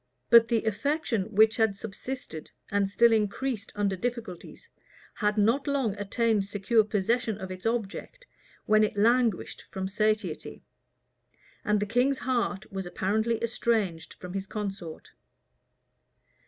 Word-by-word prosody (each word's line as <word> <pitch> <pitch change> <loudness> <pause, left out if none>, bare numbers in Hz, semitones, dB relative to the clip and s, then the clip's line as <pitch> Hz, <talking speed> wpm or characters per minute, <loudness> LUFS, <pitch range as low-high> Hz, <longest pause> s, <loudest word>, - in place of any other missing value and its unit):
But 230 -1 +8
the 230 -2 +1
affection 225 -1 -1
which 220 +1 +4
had 220 -4 +2
subsisted, 220 - -7 0.2
and 200 -1 +1
still 235 +3 +4
increased 220 +1 -1
under 200 -2 0
difficulties, 225 -4 -6 0.5
had 210 0 0
not 230 +7 +2
long 270 -7 +1
attained 210 0 0
secure 205 +3 +2
possession 215 +2 0
of 190 -3 -7
its 185 +3 -4
object, 235 - -4 0.4
when 215 0 +4
it 210 - -1
languished 230 -1 +2
from 190 -1 -4
satiety; 210 -3 -1 1.0
and 210 0 +2
the 205 - 0
king's 245 +6 +2
heart 235 -7 -2
was 190 -2 -4
apparently 220 +6 0
estranged 220 -7 -1
from 180 0 -9
his 195 0 -4
consort. 195 -6 -6
215 Hz, 125 wpm, -28 LUFS, 195-235 Hz, 1.0 s, But